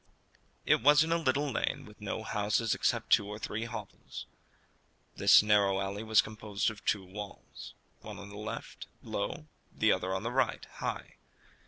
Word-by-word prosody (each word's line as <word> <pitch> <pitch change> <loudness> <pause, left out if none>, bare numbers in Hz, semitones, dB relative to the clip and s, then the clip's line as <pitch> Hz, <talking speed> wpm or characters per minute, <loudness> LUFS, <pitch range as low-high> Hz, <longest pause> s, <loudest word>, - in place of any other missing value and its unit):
It - - +4
was 150 +4 +7
in 165 - -3
a 170 - +4
little 140 -1 +1
lane - - -1
with 105 0 -16
no 105 +1 -4
houses 105 +1 0
except - - 0
two 100 - +5
or 105 0 -6
three 110 +1 -4
hovels. 110 -4 -8 0.9
This - - +7
narrow 100 -2 +3
alley 100 +1 -3
was 110 -1 +4
composed 110 0 -2
of 105 - -13
two 100 -3 +1
walls 100 +2 -9 0.2
one - - -9
on 100 +1 -9
the 100 - -11
left, 105 +1 -7 0.2
low; - - -3 0.3
the - - +2
other 95 +1 0
on 95 - -3
the 115 - -2
right, 130 -2 0
high. - - -4
105 Hz, 170 wpm, -31 LUFS, 100-115 Hz, 0.9 s, was